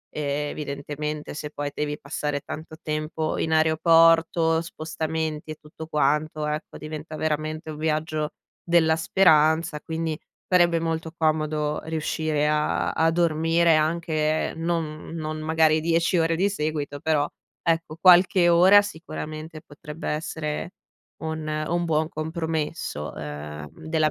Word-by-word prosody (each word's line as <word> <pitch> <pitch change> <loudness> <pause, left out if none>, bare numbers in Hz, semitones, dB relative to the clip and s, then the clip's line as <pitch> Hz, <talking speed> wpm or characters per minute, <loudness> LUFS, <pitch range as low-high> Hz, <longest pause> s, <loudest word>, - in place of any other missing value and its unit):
evidentemente 150 0 -3
se 150 0 -5
poi 145 -1 -4
devi 150 0 -3
passare 145 -1 -3
tanto 160 +2 -8
tempo 155 +1 -2
in 160 - -1
aeroporto, 165 +1 +4
spostamenti 160 -1 -4
e 155 - -5
tutto 155 +1 -11
quanto, 150 +1 0
ecco, 150 0 -4
diventa 155 0 -7
veramente 155 +1 -2
un 150 - -8
viaggio 155 0 -1 0.3
della 165 -2 +4
speranza, 160 -2 +3
quindi 160 -1 -3 0.3
farebbe 175 -2 +4
molto 160 0 -2
comodo 155 -1 0
riuscire 155 -1 -1
a 150 0 +1
a 160 0 +2
dormire 165 0 +3
anche 155 -1 0
non 165 -2 -3
non 155 -1 -4
magari 160 0 +3
10 165 +2 +2
ore 165 0 +2
di 190 +4 +2
seguito 150 -5 -3
però, 150 -2 +1 0.4
ecco, 165 -1 0
qualche 180 -1 +6
ora 185 +4 +7
sicuramente 155 -3 -7
potrebbe 150 +2 -7
essere 155 +3 -3 0.5
un 160 0 -3
un 155 +3 -1
buon 155 -1 +1
compromesso, 160 - -3
ehm, 75 +1 -7 0.2
della 155 -1 +2
155 Hz, 120 wpm, -25 LUFS, 150-165 Hz, 0.5 s, ora